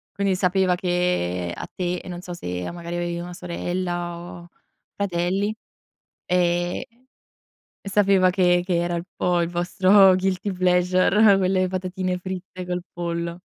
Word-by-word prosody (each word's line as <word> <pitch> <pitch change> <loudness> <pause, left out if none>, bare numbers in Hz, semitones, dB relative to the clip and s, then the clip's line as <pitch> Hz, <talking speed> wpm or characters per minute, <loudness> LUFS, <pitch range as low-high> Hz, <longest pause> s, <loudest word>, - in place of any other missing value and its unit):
Quindi 195 -1 +1
sapeva 185 0 +2
che 175 - -1
a - - -6
te, 180 -1 -2
e - - -13
non 175 0 -6
so 180 -1 -7
se 90 - -5
o - - -6
magari, 170 0 -6
avevi 175 0 -2
una 175 +1 -7
sorella, 175 0 -3
o 175 0 -10 0.5
fratelli? 195 +2 -1 0.7
Ehm, 175 0 +1 1.0
sapeva 195 -2 +3
che 180 -1 +3
che 180 -2 0
era 175 0 -1
il 170 - -3
po' 175 -1 +1
il 170 - -1
vostro 185 +2 +5
guilty 190 +1 -1
pleasure, 185 +3 +4
quelle 185 0 +2
patatine 185 0 -2
fritte 185 0 -6
col 180 0 -3
pollo. 170 0 -4
180 Hz, 140 wpm, -23 LUFS, 175-185 Hz, 1.0 s, vostro